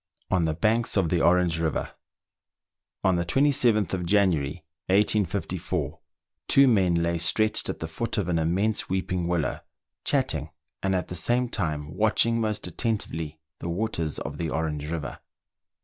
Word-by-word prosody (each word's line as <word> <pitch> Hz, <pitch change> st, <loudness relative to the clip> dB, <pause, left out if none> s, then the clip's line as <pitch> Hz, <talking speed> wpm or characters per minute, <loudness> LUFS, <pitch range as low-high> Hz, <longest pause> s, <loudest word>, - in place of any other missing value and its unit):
ON 90 Hz, -3 st, +3 dB
THE 80 Hz, -1 st, 0 dB
BANKS 110 Hz, +6 st, +1 dB
OF 90 Hz, -4 st, +2 dB
THE 85 Hz, -1 st, +1 dB
ORANGE 85 Hz, -1 st, +3 dB
RIVER. 80 Hz, -2 st, -1 dB, 1.1 s
On 95 Hz, -2 st, +3 dB
the 85 Hz, -, 0 dB
27th 120 Hz, -, +2 dB
of 90 Hz, -2 st, -1 dB
January, 85 Hz, -8 st, +1 dB, 0.2 s
1854, 100 Hz, 0 st, 0 dB, 0.5 s
two 140 Hz, 0 st, +6 dB
men 95 Hz, -8 st, +3 dB
lay 85 Hz, 0 st, 0 dB
stretched 110 Hz, +5 st, +2 dB
at -, -, -3 dB
the 80 Hz, -, -5 dB
foot 115 Hz, +10 st, -3 dB
of 100 Hz, -4 st, 0 dB
an 85 Hz, -2 st, +1 dB
immense 95 Hz, +7 st, 0 dB
weeping 90 Hz, -2 st, -1 dB
willow, 85 Hz, -5 st, -1 dB, 0.4 s
chatting, 80 Hz, -, 0 dB, 0.3 s
and 95 Hz, -1 st, +1 dB
at 90 Hz, -, -2 dB
the 90 Hz, -, -5 dB
same 120 Hz, +8 st, +1 dB
time 75 Hz, -8 st, -3 dB
watching 115 Hz, +2 st, +2 dB
most 105 Hz, -1 st, -2 dB
attentively 80 Hz, -6 st, -3 dB, 0.2 s
the 85 Hz, -, -4 dB
waters 85 Hz, -5 st, -2 dB
of -, -, -6 dB
the 85 Hz, -1 st, -1 dB
Orange 75 Hz, -1 st, -2 dB
River. 80 Hz, -3 st, -4 dB
90 Hz, 150 wpm, -26 LUFS, 80-110 Hz, 1.1 s, two